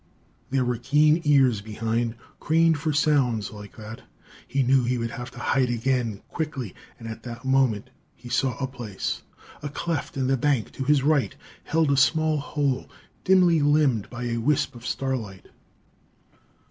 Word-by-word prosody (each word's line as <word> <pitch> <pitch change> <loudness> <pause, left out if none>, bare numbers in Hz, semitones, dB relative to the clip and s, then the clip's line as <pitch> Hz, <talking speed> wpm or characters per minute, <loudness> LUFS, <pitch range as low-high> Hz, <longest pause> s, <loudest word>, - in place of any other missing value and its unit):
There 135 -1 +1
were 120 -2 -1
keen 150 +6 +3
ears 135 -7 +4
behind, 115 +2 -2 0.2
craned 165 0 +3
for 155 +1 -1
sounds 135 -8 +1
like 105 -1 -11
that. 110 +1 -9 0.5
He 135 0 +1
knew 130 +1 +4
he 125 +1 0
would 115 -1 -3
have 120 +1 -6
to - - -16
hide 125 +1 +1
again 120 -3 -1
quickly 135 - -4 0.2
and 115 - -9
at 110 0 -7
that 120 +1 -8
moment 130 -6 +1 0.2
he 125 - -13
saw 125 0 0
a 135 - -1
place. 120 -7 -5 0.4
A 145 - -4
cleft 160 -1 -3
in 130 - 0
the 135 +1 +2
bank 130 -3 0
to 135 - -5
his 145 -1 +3
right 145 -3 +2 0.3
held 160 -3 +2
a 140 - +2
small 155 +3 +3
hole, 140 -2 -1 0.3
dimly 180 -3 +5
limned 145 -7 +2
by 125 0 -6
a 120 -1 -1
wisp 135 +5 +1
of 120 0 -9
starlight. 115 -9 -3
130 Hz, 165 wpm, -25 LUFS, 115-145 Hz, 0.5 s, dimly